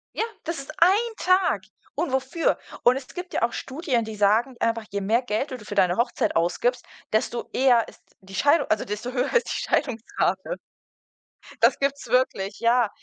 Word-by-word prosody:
Ja, - - 0 0.2
das 335 +1 -3
ist 275 +2 -8
ein 415 +7 +4
Tag. 365 - +2 0.3
Und 325 0 -1
wofür? 265 +5 +1 0.3
Und 245 - +6
es 265 -1 -6
gibt 360 0 -7
ja - - 0
auch 235 - +2
Studien, 265 -5 -2
die 220 - -6
sagen 215 +5 +2
einfach, 230 -1 0
je 200 0 -3
mehr 225 +5 +2
Geld 245 +4 -2
du 255 - -4
d 210 - -14
für 205 - -6
deine 180 -1 +3
Hochzeit 235 - 0
ausgibst, 240 +9 0 0.3
desto 230 +2 -1
eher 250 -3 +4
ist - - -15 0.2
die 195 0 -11
Scheidung 285 +8 +3
also 215 - +1
desto 210 +5 -4
höher 250 -1 -1
ist 475 - +3
die - - -2
Scheidungsrate. 245 - -1 1.0
Das - - +5
gibt's 275 -1 -1
wirklich, 220 -5 0
ja. 235 -1 +3
245 Hz, 185 wpm, -25 LUFS, 215-280 Hz, 1.0 s, Und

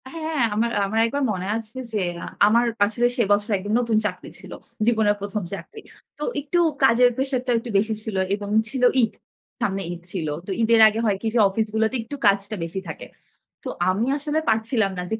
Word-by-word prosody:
হ্যাঁ, 315 -1 -3
আমার 230 +2 +1
আমার 215 +3 -1
একবার 280 +5 -1
মনে 185 -2 -4
আছে 225 +2 -9 0.2
যে, 210 - 0 0.5
আমার 235 +3 +4 0.2
আসলে 235 +3 +1
সে 235 - +3
বছর 205 +1 +2
একদম 205 +3 -4
নতুন 230 -2 +1
চাকরি - - -4
ছিল। - - -12 0.3
জীবনের 220 -3 +3
১ম 200 0 -3
চাকরি। 195 - -8 0.4
তো 295 - -5 0.2
একটু 295 +5 -1 0.2
কাজের 245 -1 +6
প্রেশারটাও 260 -2 -1
একটু 235 - -8
বেশি 220 +3 +1
ছিল 215 -2 -5 0.2
এবং 205 0 -7 0.2
ছিল 260 -1 -3 0.2
ঈদ, 225 - +1 0.5
সামনে 195 -1 -1
ঈদ 175 -1 -7
ছিল। 170 -5 -3 0.2
তো - - -3
ঈদের 225 0 +4
আগে 215 +1 0
হয় 205 -3 +1
কি 225 - -2
যে, 240 - +2
অফিস 220 +3 -1
গুলাতে 220 +3 +1
একটু 230 +6 -7
কাজটা 200 +1 +2
বেশি 165 +3 -4
থাকে। 160 - -7 0.6
তো - - -4 0.2
আমি 200 +5 +1
আসলে 295 +2 -1
পারছিলাম 220 -2 +1
না 180 - -3
যে - - +1
220 Hz, 195 wpm, -23 LUFS, 205-245 Hz, 0.6 s, কাজের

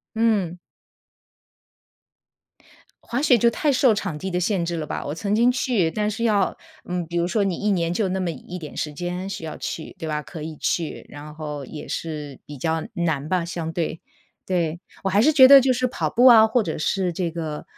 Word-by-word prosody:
嗯。 205 -6 +1 2.5
滑 245 +3 -2
雪 265 -5 +5
就 235 +2 +4
太 295 +5 +1
受 255 -4 +4
场 185 -6 -3
地 190 +4 -4
的 180 - -1
限 180 -1 0
制 170 0 -2
了 155 - -4
吧， - - -4
我 145 - -3
曾 200 +5 -1
经 235 +3 +4
去， 245 -9 +1
但 210 +3 -1
是 220 - -5
要， 205 -5 +2 0.3
嗯， 180 -1 -3
比 175 - -6
如 170 0 +2
说 205 +3 0
你 185 -3 -1
1 210 - -1
年 170 -3 +1
就 200 -1 0
那 190 - -1
么 180 -2 -1
一 180 +2 -8
点 155 -3 -9
时 150 - -3
间 180 +4 -4
需 190 - -6
要 155 - -6
去， 160 - -6
对 165 - -5
吧， 150 0 -2
可 155 0 -9
以 155 -1 -6
去， 165 -3 -2
然 150 +1 -10
后 150 -2 -6
也 150 +3 -9
是 150 -4 -5
比 145 -2 -10
较 160 +3 -1
难 160 -4 -1
吧 180 -1 +1
相 170 -1 -4
对。 165 -1 -3 0.5
对， 170 -3 -1 0.2
我 195 - +2
还 200 +3 +4
是 310 +6 +5
觉 270 -4 +9
得 275 0 +10
就 260 0 +3
是 255 +1 0
跑 250 - -2
步 245 +2 +4
啊， 225 -3 +9
或 225 +2 +2
者 165 -6 -3
是 180 +3 0
这 170 0 -2
个， 160 -2 -5
180 Hz, 225 characters per minute, -23 LUFS, 160-215 Hz, 2.5 s, 得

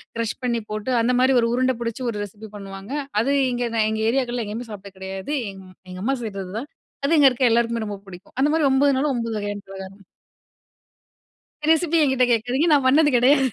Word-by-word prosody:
Crush 230 -1 -2
பண்ணி 235 -2 0
போட்டு 215 +4 -3
அந்த 250 +2 +2
மாரி 260 +1 +4
1 230 - +2
உருண்ட 255 +1 +2
பிடிச்சு 230 +2 -3
1 210 - -4
ரெசிபி 210 +2 -10
பண்ணுவாங்க. 195 +2 -9 0.3
அது 275 +4 +1 0.2
இங்கே 245 0 -1 0.2
எங்க 220 0 -2
ஏரியாக்கள்ல 245 -2 0
எங்கயுமே 225 +3 -6
சாப்பிட்டது 200 -1 -10
கெடையாது. 190 +7 -5 0.2
எங்க 190 -1 -13 0.3
எங்கம்மா 210 +10 -1
செய்றதுதான், 205 +5 -5 0.4
அது 315 +3 +3
இங்க 275 -2 +8
இருக்கிற 250 -1 +2
எல்லாருக்குமே 230 -1 +1
ரொம்ப 200 -1 -6
பிடிக்கும். 180 -1 -13
அந்த 295 +2 +3
மாதிரி 310 -4 +3
9னாலும் 275 +1 +2
9 230 -2 -2
வகையான 205 0 -4
பலகாரம். 195 +1 -9 1.7
ரெசிபி 325 0 +3
எங்கிட்ட 265 -2 +3
கேட்காதீங்க, 245 +8 +1
நான் 280 -3 +4
பண்ணது 295 +3 +5
கெடையாது, 270 +2 +4
235 Hz, 175 wpm, -23 LUFS, 205-265 Hz, 1.7 s, இங்க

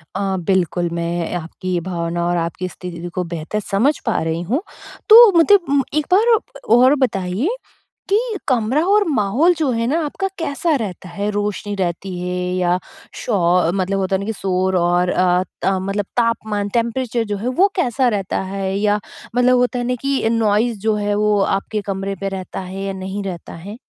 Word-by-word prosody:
अ, 195 -1 -1
बिल्कुल, 175 -2 +1
मैं 170 0 -2
आपकी 175 +2 -3
भावना 170 -1 -2
और 175 0 +1
आपकी 170 +2 -2
स्थिति 175 -1 -7
को 180 - -1
बेहतर 170 +6 -3
समझ 215 +9 +1
पा 225 - +1
रही 160 +1 -2
हूँ, 235 - -1 0.5
तो 455 0 +10
मुझे 405 +5 +7
म 280 0 +3
एक 305 0 +1
बार 450 +4 +5 0.4
और 255 +3 +6
बताइए, 195 - -2 0.6
कि 400 - +4 0.3
कमरा 255 +2 +2
और 415 +1 +4
माहौल 265 - +3
जो 305 -4 +1
है 230 -1 0
ना 305 +6 +1
आपका 385 +6 -2
कैसा 325 +1 0
रहता 185 -4 -6
है? 200 +4 -3
रोशनी 205 0 -2
रहती 185 0 -3
है 180 0 -3 0.2
या 180 -1 +2 0.5
शो 180 -5 +2
मतलब 195 +1 0
होता 190 0 0
है - - 0
ना - - -4
कि 225 - -2
शोर 190 -2 0
और 175 +1 +2
अ, 180 0 +2 0.2
त - - 0 0.2
मतलब 195 +1 -2
तापमान 215 -3 0
टेंपरेचर 235 0 0
जो - - -2
है 215 +5 -4
वो 395 - +7
कैसा 260 - +1
रहता 200 -4 -2
है? 190 0 -3
या 210 0 +2 0.4
मतलब 250 +1 +4
होता 245 0 +1
है 245 - -2
ना 250 - 0
कि 275 -4 0
नॉइज़ 225 0 +1
जो 215 +1 +1
है 205 0 -1
वो 210 0 +2
आपके 195 +2 -1
कमरे 195 +1 -3
पे 195 - -1
रहता 190 -1 -6
है 190 +1 -6
या 195 0 -3
नहीं 190 +1 -5
रहता 185 -3 -6
है? 195 +7 -9
200 Hz, 185 wpm, -19 LUFS, 185-240 Hz, 0.6 s, तो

